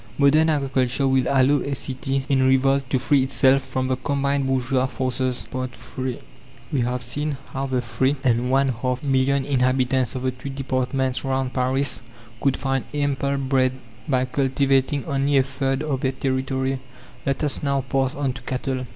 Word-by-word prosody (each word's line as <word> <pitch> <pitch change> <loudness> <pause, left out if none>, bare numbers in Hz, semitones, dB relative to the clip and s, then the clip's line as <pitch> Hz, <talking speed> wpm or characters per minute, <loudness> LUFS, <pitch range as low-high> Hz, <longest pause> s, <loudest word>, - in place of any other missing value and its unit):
Modern 150 +3 +5
agriculture 135 -2 +1
will 130 -1 +2
allow 140 +1 +4
a 140 - -2
city 135 +1 -2
in 135 -2 +2
revolt 130 +1 +3
to 130 - +2
free 135 +2 +3
itself 135 +1 +3
from 130 -1 -3
the 130 0 0
combined 140 +1 0
bourgeois 130 0 +1
forces. 130 -1 -2
III 130 0 -4 0.5
We 135 - +2
have 125 +1 -1
seen 145 +4 -2 0.2
how 135 +1 -2
the 130 -2 -1
three 125 +4 +1
and 125 -1 +2
one 135 +1 +3
half 125 +2 -2
million 135 0 +2
inhabitants 130 -2 +1
of 130 - -4
the 130 - +1
two 130 +2 -8
departments 130 -1 -1
round 130 -1 -1
Paris 130 +2 0 0.4
could 135 -2 +2
find 135 0 -1
ample 140 -1 0
bread 130 -1 +1 0.3
by 130 -3 +2
cultivating 135 +1 +1
only 140 -1 +1
a 135 - +5
third 135 +1 -2
of 140 -4 -2
their 130 0 0
territory. 130 0 -1 0.4
Let 135 +2 -1
us 145 -3 -1
now 140 -1 +1
pass 135 0 -1
on 140 -3 -1
to 130 - -9
cattle. 130 +1 -3
135 Hz, 170 wpm, -23 LUFS, 130-140 Hz, 0.5 s, Modern